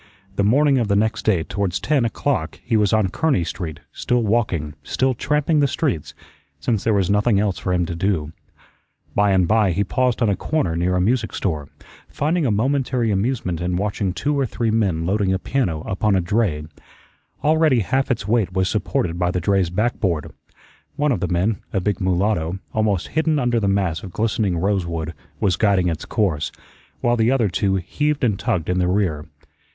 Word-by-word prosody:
The 100 - +1
morning 135 +5 +4
of 115 - 0
the 100 - +2
next 110 +1 0
day 95 -7 +2
towards 100 0 -2
ten 145 -5 +1
o'clock 115 - -2
he 120 - 0
was 105 -2 +3
on 110 -4 +2
Kearney 140 - +1
Street, 85 -3 -5
still 125 -1 0
walking, 100 -9 0
still 130 0 0
tramping 150 +5 +1
the 145 - +4
streets, 130 - -2 0.4
since 105 +7 -1
there 110 -2 +2
was 95 -2 +1
nothing 105 0 +3
else 100 -2 0
for 95 - -2
him 90 -1 +1
to 85 - -4
do. 85 -3 -1 0.8
By 105 0 +3
and 95 -2 +3
by 105 -4 +3
he 100 +4 +1
paused 125 +4 0
on - - +3
a 100 - +2
corner 125 - -1
near 90 +2 +1
a - - +2
music 110 +4 0
store, 75 -7 -2 0.4
finding 155 +1 0
a - - +1
momentary 125 0 +1
amusement 100 -5 -1
in 90 0 -1
watching 100 0 -1
two 145 +10 -1
or 135 - +1
three 115 +1 -1
men 95 -7 +1
loading 95 +1 +1
a - - +1
piano 95 - -1
upon 100 +4 0
a - - +3
dray. 90 -4 0 0.8
Already 155 -5 +3
half 130 +8 0
its 110 -6 -1
weight 105 -5 +1
was 95 0 +1
supported 90 -4 -1
by 90 0 +1
the 90 - -1
dray's 95 0 +1
backboard. 95 -5 -1 0.6
One 145 0 +1
of 120 - 0
the 90 - -1
men, 95 +5 0
a 95 - +2
big 100 +1 -1
mulatto, 95 -2 0 0.2
almost 105 -5 0
hidden 160 0 +1
under 120 -3 +1
the 100 - 0
mass 95 -5 0
of 95 - -8
glistening 105 -4 0
rosewood, 85 -4 -1 0.3
was 95 -3 +1
guiding 95 -4 +2
its 80 -2 -4
course, 85 -9 0 0.5
while 120 0 +2
the 115 0 +2
other 125 -6 +2
two 95 +2 0
heaved 150 - -1
and 105 -5 +1
tugged 85 -4 -1
in 90 0 0
the 90 - +2
rear. 90 -6 0
100 Hz, 195 wpm, -21 LUFS, 90-120 Hz, 0.8 s, morning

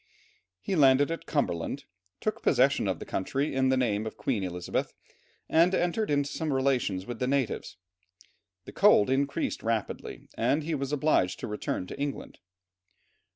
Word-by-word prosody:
He 190 - -2
landed 140 0 +5
at 165 - -5
Cumberland, 115 - -1 0.4
took - - -2
possession - - +3
of - - 0
the - - -8
country 135 +10 -2
in 130 0 +2
the 130 - +3
name 110 -4 0
of - - -7
Queen 115 -7 -1
Elizabeth, 90 -1 -3 0.5
and 170 +4 +4
entered 180 +6 0
into 145 -1 +1
some 160 -2 -2
relations 130 -8 0
with 120 0 -6
the 125 - 0
natives. 135 -9 -1 0.9
The - - -9
cold 105 +5 +5
increased 140 +1 0
rapidly, 115 -2 -3
and 135 +7 +1
he 165 +2 -2
was 140 -2 -2
obliged 150 -11 +1
to - - -3
return 105 -3 -3
to 90 - -9
England. 140 0 -4
135 Hz, 155 wpm, -28 LUFS, 110-145 Hz, 0.9 s, landed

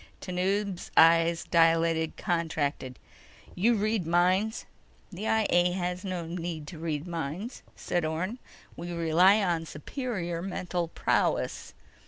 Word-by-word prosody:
Tanub's 190 +1 -2
eyes 165 0 +5
dilated, 165 -1 +2
contracted. 155 -7 -2 0.6
"You 230 +6 +3
read 215 -4 0
minds?" 185 +6 +2 0.5
"The 200 +4 -5
I 220 -1 +2
A 175 0 +3
has 180 0 -3
no 185 -3 -3
need 165 -2 -5
to 165 - -9
read 155 -2 -3
minds," 175 - -5
said 175 -1 -2
Orne. 175 +9 -2 0.4
"We 175 +1 -6
rely 175 +5 +4
on 170 -3 -1
superior 175 - -4
mental 180 -2 -3
prowess." - - -1
175 Hz, 120 wpm, -28 LUFS, 165-190 Hz, 0.6 s, eyes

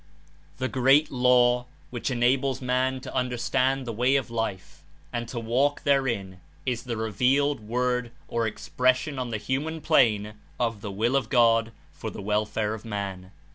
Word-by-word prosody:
The 130 - -1
great 135 +4 +3
Law, 125 -1 +3 0.2
which 120 +1 -3
enables 130 +2 +1
man 130 0 0
to - - -8
understand 130 +1 0
the 115 - -4
way 125 +5 +2
of 135 -3 -1
Life 95 -10 -4 0.3
and 120 -1 -3
to 120 0 -4
walk 130 +6 +1
therein, 115 -10 0 0.2
Is 120 -1 -2
the 120 -2 -3
revealed 125 +7 +1
Word 125 +2 -1 0.2
or 115 -1 0
expression 130 +5 0
on 125 -1 -3
the 110 - -2
human 145 +8 -2
plane 110 -10 +3 0.3
of 115 -4 -1
the 105 - -5
Will 115 +7 0
of 130 -5 0
God 115 -2 +4 0.2
for - - -6
the - - -9
welfare 105 +1 -1
of 110 - -7
man. 100 -4 -5
120 Hz, 160 wpm, -26 LUFS, 110-130 Hz, 0.3 s, God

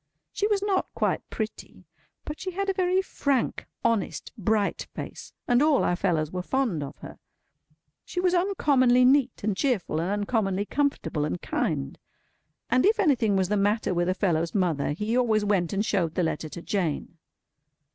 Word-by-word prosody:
She 410 - +1
was 410 -2 +1
not 395 -2 +1
quite - - -1
pretty; 215 -4 -6 0.4
but 300 - -6
she 380 - -4
had 395 +2 -2
a - - +2
very 370 0 +1
frank, 280 -8 -1 0.2
honest, 230 -5 0
bright 210 0 0
face, - - -7 0.2
and 245 +1 +4
all 300 -2 +4
our 175 - +2
fellows 165 -4 0
were 180 - -3
fond 230 - -1
of 140 +1 -7
her. - - -10 0.8
She 360 - -5
was 360 0 +2
uncommonly 280 -10 +3
neat 265 -2 +3
and 210 -1 0
cheerful, 190 - 0
and 175 - -2
uncommonly 205 -1 0
comfortable 280 - -1
and 90 -12 -2
kind. 70 - -2 0.7
And 255 - +4
if 435 +2 +3
anything 255 - +3
was 190 -1 +1
the 210 - +1
matter 205 0 +1
with 175 0 +1
a 185 - +1
fellow's 170 -3 0
mother, 170 -7 +1
he 210 +8 -2
always 220 -4 +2
went 190 -5 +1
and 205 +2 0
showed 170 -7 0
the 180 - +1
letter 160 -1 -2
to 170 - -8
Jane. 170 -3 -2
210 Hz, 175 wpm, -26 LUFS, 180-280 Hz, 0.8 s, and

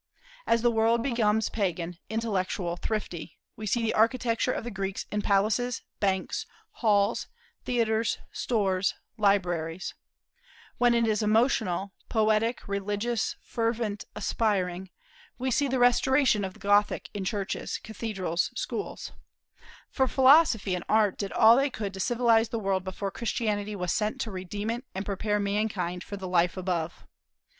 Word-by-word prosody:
As 230 0 +3
the 240 - +4
world 230 +1 +2
becomes 220 -4 +1
pagan, 175 -4 -2
intellectual, 195 -5 -1
thrifty, 175 -6 -4 0.2
we 215 0 -6
see 230 +4 +1
the 225 - +1
architecture 230 +1 +2
of - - -3
the 240 - -5
Greeks 195 -1 -3
in 210 - 0
palaces, 215 +5 +1 0.2
banks, 190 -2 -1 0.2
halls, 210 -1 +1 0.4
theatres, 230 -2 +1
stores, 195 -5 0 0.2
libraries; 180 -4 +1 0.9
when 245 -1 +4
it 235 0 +3
is 215 -1 +1
emotional, 210 -4 +1 0.2
poetic, 220 +1 +1
religious, 205 +3 -1
fervent, 225 -3 -2
aspiring, 190 -4 -1 0.5
we 260 +1 -1
see 285 +2 +2
the 260 0 0
restoration 245 -2 +4
of 190 -1 -4
the - - -16
Gothic 205 +1 +2
in 205 - -3
churches, 200 0 -3
cathedrals, 195 -6 -2
schools, - - -4 0.8
for 265 -1 +2
Philosophy 260 - +5
and 180 - -2
Art 210 -3 +3
did 200 -2 -4
all 225 0 +7
they 275 +1 +2
could 205 -6 -5
to 190 - -8
civilize 230 0 +3
the 230 - -2
world 195 -3 0
before 195 +1 -4
Christianity 210 -2 -2
was 180 -3 -1
sent 215 +5 -1
to 230 -5 -3
redeem 200 +3 -4
it 240 +2 -4
and 190 +1 -3
prepare 210 +1 -1
mankind 200 -3 -1
for 200 - -7
the 190 -1 -6
life 180 0 +2
above. 175 -3 -3
210 Hz, 145 wpm, -28 LUFS, 190-230 Hz, 0.9 s, all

